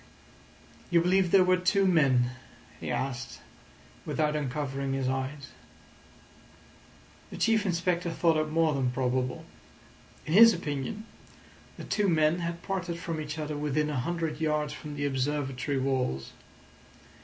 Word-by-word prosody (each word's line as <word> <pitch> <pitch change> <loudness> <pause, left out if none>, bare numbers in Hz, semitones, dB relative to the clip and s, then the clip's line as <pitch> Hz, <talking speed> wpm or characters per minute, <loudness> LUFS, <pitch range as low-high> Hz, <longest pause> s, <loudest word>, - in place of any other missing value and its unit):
"You 175 - +4
believe 180 +1 +2
there 190 +1 +6
were 185 0 +3
two 195 +2 +2
men?" 135 -9 +3 0.5
he - - -5
asked, 125 -3 -3 0.6
without 150 -1 0
uncovering 140 -1 -2
his 135 -1 -1
eyes. 135 +2 -3 1.8
The - - -8
Chief 220 -2 +2
Inspector 175 0 0
thought 165 0 +2
it 155 0 0
more 160 0 +2
than 135 -2 0
probable. 125 0 -1 0.8
In 155 - -3
his 230 +2 +8
opinion, 170 +7 -4 0.7
the - - -8
two 205 -2 0
men 155 0 +3
had 170 0 -4
parted 180 -3 -3
from 165 -2 -4
each 150 +1 -5
other 150 -1 -3
within 150 +1 -1
a 140 - -1
hundred 160 +1 -3
yards 150 -1 0
from 150 -1 -8
the 145 0 -2
Observatory 140 0 -1
walls. 130 - -1
150 Hz, 135 wpm, -28 LUFS, 135-170 Hz, 1.8 s, his